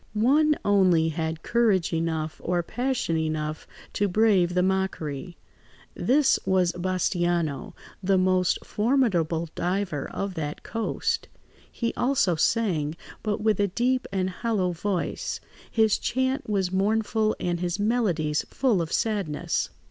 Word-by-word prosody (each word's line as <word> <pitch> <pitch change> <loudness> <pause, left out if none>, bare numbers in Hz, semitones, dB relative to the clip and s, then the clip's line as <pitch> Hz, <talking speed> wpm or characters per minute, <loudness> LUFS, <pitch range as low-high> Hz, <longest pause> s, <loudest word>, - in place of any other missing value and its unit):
One 295 +8 +4
only 185 -5 +4
had 160 0 -3
courage 215 -8 +2
enough 160 -1 -2
or 175 0 0
passion 245 -5 -1
enough 155 -1 -2 0.3
to 205 - +1
brave 190 -3 +3
the 180 - +3
mockery; 180 -4 -2 0.6
this 275 +2 +3
was 185 -2 +2
Bastiano, 175 -3 -1 0.3
the 195 0 +2
most 185 -1 +2
formidable 190 - +1
diver 180 -5 -2
of 195 -1 -4
that 150 -3 -5
coast. 225 0 -2 0.4
He 230 -1 -2
also 245 -8 +2
sang, 160 -4 +1 0.3
but 210 -2 -2
with 215 -2 +2
a 200 - +3
deep 250 +6 0
and 190 -1 -1
hollow 190 -2 -1
voice; 175 +1 -2 0.3
his 220 -2 +3
chant 260 +1 -1
was 190 -3 0
mournful 215 +2 +1
and 175 -1 -1
his 175 0 -1
melodies 200 -9 +1
full 240 -9 +1
of 165 - -4
sadness. 200 -9 -1
185 Hz, 125 wpm, -26 LUFS, 170-220 Hz, 0.6 s, One